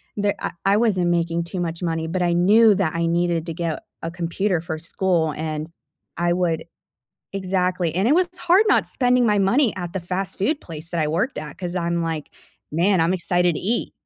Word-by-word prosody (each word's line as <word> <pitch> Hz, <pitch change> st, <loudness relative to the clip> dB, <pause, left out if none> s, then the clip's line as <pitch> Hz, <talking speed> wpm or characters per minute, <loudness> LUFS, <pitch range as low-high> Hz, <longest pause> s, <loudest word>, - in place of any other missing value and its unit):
there, 205 Hz, -1 st, 0 dB
I -, -, -3 dB
I 200 Hz, +1 st, +4 dB
wasn't 195 Hz, -6 st, +2 dB
making 170 Hz, 0 st, 0 dB
too 180 Hz, +2 st, -5 dB
much 170 Hz, -1 st, -3 dB
money, 165 Hz, -2 st, -1 dB
but 180 Hz, +3 st, -2 dB
I 175 Hz, -1 st, +2 dB
knew 210 Hz, +5 st, +5 dB
that 185 Hz, -5 st, 0 dB
I 170 Hz, 0 st, 0 dB
needed 170 Hz, -1 st, 0 dB
to 165 Hz, -, -3 dB
get 165 Hz, -1 st, -3 dB, 0.2 s
a 165 Hz, -, -3 dB
computer 175 Hz, +1 st, -1 dB
for 165 Hz, -1 st, -4 dB
school, 170 Hz, -1 st, 0 dB
and 155 Hz, 0 st, -4 dB, 0.5 s
I 175 Hz, 0 st, +1 dB
would 170 Hz, -3 st, 0 dB, 0.7 s
Exactly. 185 Hz, -3 st, 0 dB
And 190 Hz, +6 st, +1 dB
it 290 Hz, -, +4 dB
was 365 Hz, 0 st, +3 dB
hard 360 Hz, +4 st, +4 dB
not -, -, +3 dB
spending 250 Hz, -1 st, +2 dB
my 210 Hz, -1 st, +3 dB
money 220 Hz, +6 st, +3 dB
at 175 Hz, -2 st, -5 dB
the 190 Hz, -, -2 dB
fast 185 Hz, +2 st, -3 dB
food 285 Hz, +10 st, +1 dB
place 160 Hz, 0 st, -9 dB
that 170 Hz, -, -2 dB
I 155 Hz, -, +1 dB
worked, 190 Hz, -, -1 dB, 0.2 s
'cause 180 Hz, -1 st, -4 dB
I'm 170 Hz, -1 st, 0 dB
like, 160 Hz, -2 st, -4 dB, 0.4 s
man, 180 Hz, +5 st, +2 dB
I'm 165 Hz, +3 st, +2 dB
excited 175 Hz, -1 st, +1 dB
to -, -, -4 dB
eat. 225 Hz, +5 st, -1 dB
175 Hz, 205 wpm, -22 LUFS, 165-195 Hz, 0.7 s, knew